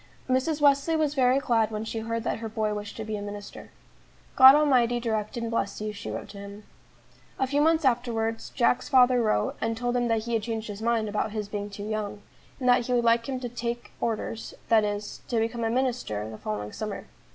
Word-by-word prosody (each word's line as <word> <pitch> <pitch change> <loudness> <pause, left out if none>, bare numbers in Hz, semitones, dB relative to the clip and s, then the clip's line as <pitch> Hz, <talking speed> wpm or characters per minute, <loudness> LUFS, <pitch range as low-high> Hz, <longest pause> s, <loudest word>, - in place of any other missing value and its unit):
Mrs. 265 +4 0
Wesley 285 +3 +4
was 305 -2 +1
very 260 -2 +3
glad 230 -5 +2
when 215 0 -4
she 225 0 -4
heard 230 0 -3
that - - -2
her 225 -1 -5
boy 215 -1 -1
wished 205 0 -6
to 220 - -4
be 215 0 -3
a - - -6
minister. 205 0 -8 0.7
"God 265 +1 +10
Almighty 250 -5 +3
direct 220 -2 -2
and 230 -1 -3
bless 215 -3 -1
you," 215 0 -4
she 200 - -7
wrote - - -6
to 200 - -10
him. 200 +1 -9 0.7
A 265 - +1
few 285 +2 +1
months 320 0 +3
afterwards, 230 -3 0
Jack's 245 0 +1
father 250 -2 +5
wrote, 160 - +1
and 225 0 -1
told 245 +1 -1
him 245 -1 +1
that 225 -1 +1
he 235 +1 -4
had 225 - +2
changed 225 0 -4
his 205 +1 -7
mind 230 -1 +1
about 210 +1 -2
his 210 -2 -3
being 205 0 -4
too 205 +1 -7
young, 210 -1 -4 0.4
and 255 - -2
that 245 -1 +4
he 250 - 0
would 240 -1 +2
like 230 +2 +3
him 260 -1 -2
to 245 - -3
"take 240 0 -4
Orders," 225 0 -3
that 225 -2 +5
is, 205 0 -4
to 235 - -1
become 230 +1 -1
a 225 - +1
minister, 235 - -1
the 110 0 -9
following 105 0 -4
summer. 215 -2 -5
230 Hz, 225 wpm, -27 LUFS, 215-250 Hz, 0.7 s, God